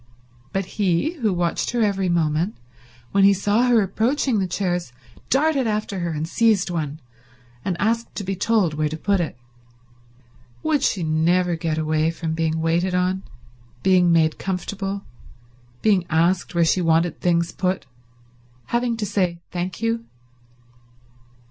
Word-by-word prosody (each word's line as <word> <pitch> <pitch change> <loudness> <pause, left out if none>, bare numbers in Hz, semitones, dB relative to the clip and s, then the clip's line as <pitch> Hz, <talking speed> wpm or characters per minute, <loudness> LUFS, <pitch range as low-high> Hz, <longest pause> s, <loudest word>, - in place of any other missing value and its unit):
But 195 0 -1
he, 190 - 0
who 220 -5 +1
watched 175 -2 -1
her 240 -2 +2
every 195 -3 +1
movement, 170 +3 0 0.5
when 200 0 +3
he 200 0 +7
saw 205 +6 +2
her 235 -4 +4
approaching 225 +4 0
the 190 - 0
chairs 175 -5 -2 0.4
darted 275 -2 +2
after 210 -2 -2
her 170 -1 -2
and 155 0 -3
seized 205 -1 +2
one 155 -3 -3 0.6
and 180 -2 -2
asked 230 +2 0
to 205 - -4
be 195 +1 -2
told 200 -4 +1
where 150 0 0
to 155 - -5
put 200 +4 +1
it. 160 -7 -3 1.3
Would 310 -3 +1
she 195 -9 +1
never 170 +3 +2
get 160 -1 -2
away 155 0 +1
from 165 -1 -3
being 160 0 -1
waited 170 +3 +1
on, 185 +1 +1 0.6
being 180 -2 +4
made 160 -2 +3
comfortable, 195 +1 -3 0.8
being 195 -5 +3
asked 175 +3 +1
where 170 -1 +4
she 180 +3 +2
wanted 165 0 +2
things 170 -1 +1
put, 185 0 -1 0.9
having 235 -1 +1
to 215 - -2
say 185 -4 0
thank 180 +3 -4
you? 230 0 0
185 Hz, 150 wpm, -22 LUFS, 165-205 Hz, 1.3 s, he